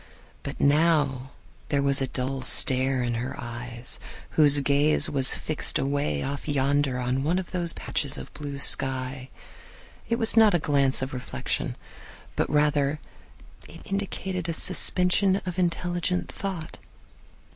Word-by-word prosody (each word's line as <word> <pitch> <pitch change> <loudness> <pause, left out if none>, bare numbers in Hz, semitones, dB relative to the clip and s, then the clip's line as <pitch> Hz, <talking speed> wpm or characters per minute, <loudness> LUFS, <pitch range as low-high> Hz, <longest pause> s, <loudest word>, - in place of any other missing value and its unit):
But - - -8
now 145 -3 +1 0.4
there 140 -1 0
was 140 0 +2
a 135 - -1
dull 130 +1 -3
stare 130 -1 +3
in 120 -1 -2
her 130 +3 -6
eyes, 120 +1 -6 0.3
whose 145 -2 +5
gaze 145 +2 +5
was 135 -2 +5
fixed 155 - 0
away 135 - -2
off 140 +2 -6
yonder 140 -2 0
on 125 +1 -2
one 165 +5 0
of 185 -2 -6
those 175 -2 +2
patches 140 -3 -3
of - - -10
blue 145 -1 -7
sky. 130 -1 +2 0.8
It 230 - 0
was 225 -2 -1
not 220 -4 +5
a - - +4
glance 140 -4 0
of 130 - -6
reflection, 125 - -4 0.6
but - - -1
rather 150 -1 +1 0.9
indicated 190 -3 -4
a - - -2
suspension 180 +2 +1
of 180 0 -5
intelligent 175 0 -2
thought. 185 -5 -7
145 Hz, 135 wpm, -25 LUFS, 130-170 Hz, 0.9 s, whose